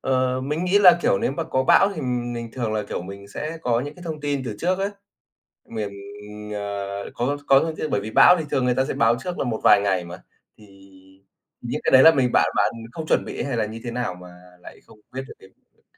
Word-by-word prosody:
ờ, 130 -1 0
mình 150 +6 -2
nghĩ 185 +3 +3
là, 180 -4 +7
kiểu, 95 - +2
nếu 130 - -1
mà 165 +3 -3
có 130 -3 -1
bão 195 +8 +5
thì 160 - -5
mình 120 -3 -3
thường 120 -4 -3
là, 105 -1 -1
kiểu, - - -4
mình 100 +2 -10
sẽ 155 +9 -6
có 120 -3 +1
những 145 +3 -6
cái 180 - -14
thông 160 -3 -6
tin 145 -2 -2
từ 115 - -4
trước 185 +2 0
ấy. 195 +1 -1 0.8
Miền, 110 -3 -4 0.6
ờ, 100 -1 -5
có 130 +4 -1
có 135 0 +6
thông 160 -1 -3
tin 155 - -4
bởi - - 0
vì 105 +2 -6
bão 180 +10 +7
thì 160 - -3
thường 130 - 0
người 125 0 +2
ta 130 +1 +1
sẽ - - -4
báo 115 +1 +3
trước 180 +4 -5
là - - -1
một 115 -3 -3
vài - - +7
ngày 95 -3 0
mà, 85 +2 -9 0.4
thì 110 - -16 1.0
những - - -4
cái - - +2
đấy 130 - +8
là 160 - +9
mình 125 -3 +1
bạn - - +4
bạn - - +2 0.2
không 160 +2 -6
chuẩn - - +1
bị - - -5
hay 135 -3 -3
là 110 - 0
như 110 +2 -8
thế 120 - -4
nào 120 -6 -3
mà 90 0 -13 0.3
lại - - -13
không 105 - -19
biết 130 - -4
được - - -10
cái 95 - -17
việc - - -38
đ - - -35
125 Hz, 260 wpm, -23 LUFS, 105-150 Hz, 1.0 s, là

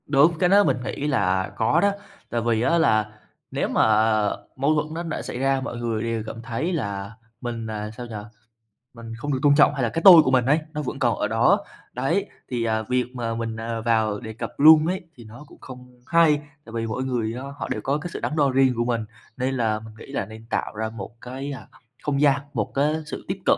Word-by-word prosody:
Đúng, 150 +4 +4
cái 180 - +3
đó 200 +2 +6
mình - - +1
nghĩ 140 +3 -3
là 95 -8 +1
có 115 +9 +2
đó. 200 - +4 0.4
Tại 120 - -1
vì 115 -1 +1
á 135 +7 +3
là 110 -10 +2 0.4
nếu - - -1
mà - - +2 0.7
mâu 140 +4 +2
thuẫn 155 0 -1
nó 170 +1 -4
đã 165 -2 -4
xảy - - -6
ra, 135 0 +1
mọi 130 -3 -5
người 115 -2 -2
đều 115 -1 -2
cảm 115 - -7
thấy 120 +10 -3
là 100 - -3 0.3
mình, 115 -2 -4
à, 105 -1 -4
sao 125 - -6
nhỉ, 115 -2 -8 0.8
mình 115 -1 -9
không 145 +5 -3
được 130 - -1
tôn 145 -1 +5
trọng 145 -1 +5
hay 135 -3 -2
là 115 - +1
cái 165 - -3
tôi 175 -4 +11
của 130 - +1
mình 125 -2 +3
ấy, 145 +5 +3
nó 150 - -2
vẫn 140 - -5
còn - - +1
ở - - 0
đó, - - +3 0.3
đấy, - - 0 0.2
thì, 120 -2 -1
à, 110 -1 0
việc 125 +3 0
mà 115 -2 -2
mình, 115 -1 -3
à, 115 0 -3
vào 110 -3 +1
đề 110 -2 -7
cập 110 - -5
luôn 155 +1 +8
ấy, 185 +2 -1
thì 120 - -13
nó 115 +6 -12
cũng - - -17
không 125 -1 -12
hay. 165 -3 +5 0.3
Tại 115 - -12
vì 115 0 -1
mỗi 115 +4 -3
người 120 -4 -1
á, 125 - -6 0.2
họ - - -5
đều 110 - -2
có 140 +6 0
cái 165 +4 -6
sự - - -4
đắn 150 - -3
đo 145 -3 +3
riêng 130 0 +4
của 120 +1 0
mình, 115 -2 -1 0.3
nên 130 +1 -1
là 110 -4 0
mình 110 0 -12
nghĩ 125 - -12
là 120 - -2
nên 110 +2 -12
tạo - - -2
ra 110 +1 -2
một 115 +1 -8
cái, 135 +3 -6
à, 125 -7 -8 0.4
không 140 -1 0
gian, 140 -2 +4
một - - -2
cái 145 +3 +2
sự 150 - -7
tiếp 185 - -2
cận, - - +4
125 Hz, 245 wpm, -24 LUFS, 115-145 Hz, 0.8 s, tôi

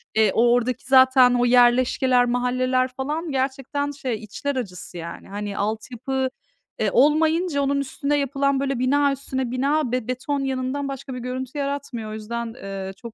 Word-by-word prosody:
eee, 215 -3 +4
o 235 +1 +4
oradaki 245 0 0
zaten 260 -1 +6
o 245 0 +2
yerleşkeler, 245 +1 +4
mahalleler 255 +1 +1
falan 300 +4 -3
gerçekten 270 +2 -2
şey 265 -4 -3
içler 280 +7 -4
acısı 180 -7 -6
yani. 170 +2 -8
Hani, 205 0 -5
altyapı 250 +5 -2 0.5
e, - - +1
olmayınca 310 +3 +3
onun 280 0 +1
üstüne 280 +2 -1
yapılan 275 0 0
böyle 275 -2 -1
bina 280 +2 +3
üstüne 260 -2 -3
bina 275 +1 0
be 250 -2 -2
beton 255 +3 -2
yığınından 270 +1 -2
başka 270 0 -6
bir - - -5
görüntü 255 +3 -5
yaratmıyor. 275 -6 -4
O - - -6
yüzden, 230 +2 -5
ııı, 195 -2 -6
çok 235 +2 -11
255 Hz, 160 wpm, -23 LUFS, 240-280 Hz, 0.5 s, zaten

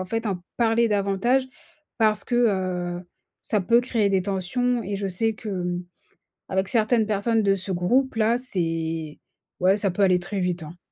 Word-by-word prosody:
en 185 - -2
fait, 225 +4 -3
en 190 -3 -1 0.2
parler 230 0 +3
davantage 210 +6 +1 0.5
parce 215 -2 +2
que, 245 - -3
heu, 185 -6 0 0.4
ça 210 -3 0
peut 235 +6 +4
créer 230 -5 +1
des 190 -2 +2
tensions, 230 +6 -1
et 200 +1 -3
je 200 0 -3
sais 220 +4 -1
qu'avec 180 -5 -5 0.6
certaines 220 +1 +2
personnes 220 +2 +1
de 195 0 +3
ce 190 0 -5
groupe-là, 230 +4 +2
c'est 165 -8 -2 0.4
ouais, 190 +3 +4
ça 200 -3 0
peut 200 - -2
aller 180 -2 +4
très 195 +2 -4
vite, 180 -2 -1
hein. 165 +3 -10
200 Hz, 165 wpm, -24 LUFS, 180-225 Hz, 0.6 s, peut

